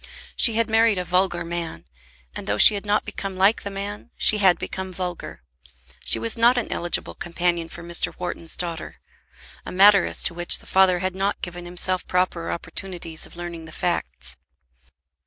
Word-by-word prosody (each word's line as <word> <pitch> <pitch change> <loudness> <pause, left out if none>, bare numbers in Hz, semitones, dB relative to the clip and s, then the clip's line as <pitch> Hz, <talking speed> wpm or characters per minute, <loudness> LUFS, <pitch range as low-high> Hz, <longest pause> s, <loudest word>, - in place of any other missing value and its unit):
She 230 - +4
had 230 0 +2
married 225 -2 +3
a 180 - -2
vulgar 175 -1 +1
man; 170 - -4 0.5
and, - - -6
though 100 0 0
she 215 - +8
had 205 0 -5
not 205 +1 +2
become 195 -2 -5
like 195 +4 +4
the 200 - -5
man, 200 +3 -6
she 215 - +3
had 185 -4 +5
become 190 +2 -5
vulgar. 180 -1 -6 0.6
She - - +1
was 115 0 -1
not 240 +2 +5
an 245 - -2
eligible 175 0 -2
companion 175 -1 -1
for 170 - -9
Mr. 170 0 -1
Wharton's 170 -2 -2
daughter, 170 -3 -4 0.7
a - - -7
matter 200 0 +6
as - - -1
to - - -1
which 175 0 0
the - - -17
father 190 -1 +4
had 185 - -1
not 195 +2 -2
given 175 0 -6
himself 180 +1 -1
proper 180 -2 0
opportunities 170 -1 -6
of - - -16
learning 170 -1 -7
the 160 - -11
facts. 65 - -3
180 Hz, 180 wpm, -23 LUFS, 170-195 Hz, 0.7 s, she